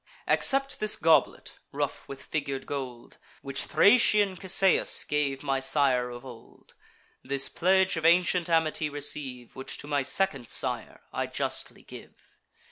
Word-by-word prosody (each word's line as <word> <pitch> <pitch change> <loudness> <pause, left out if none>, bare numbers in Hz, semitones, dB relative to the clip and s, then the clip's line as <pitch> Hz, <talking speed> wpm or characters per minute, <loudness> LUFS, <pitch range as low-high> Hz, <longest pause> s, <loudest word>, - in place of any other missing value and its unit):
Accept 275 0 +3
this 215 0 +2
goblet, 160 0 0
rough - - -4
with 140 0 -10
figur'd 140 -3 -4
gold, 130 -4 -8 0.2
Which 135 0 -2
Thracian 205 -3 +3
Cisseus 190 0 +2
gave 145 -2 -2
my 135 -2 -1
sire 130 -2 +1
of 120 +1 -10
old: 120 -3 -15 0.5
This 140 0 0
pledge 190 0 +1
of 165 - -4
ancient 175 0 +2
amity 160 -2 0
receive, 140 -4 -3
Which 130 - -5
to - - -8
my 145 -1 0
second 135 - -1
sire - - -1
I - - -3
justly - - -4
give." - - -13
145 Hz, 135 wpm, -27 LUFS, 135-180 Hz, 0.5 s, Accept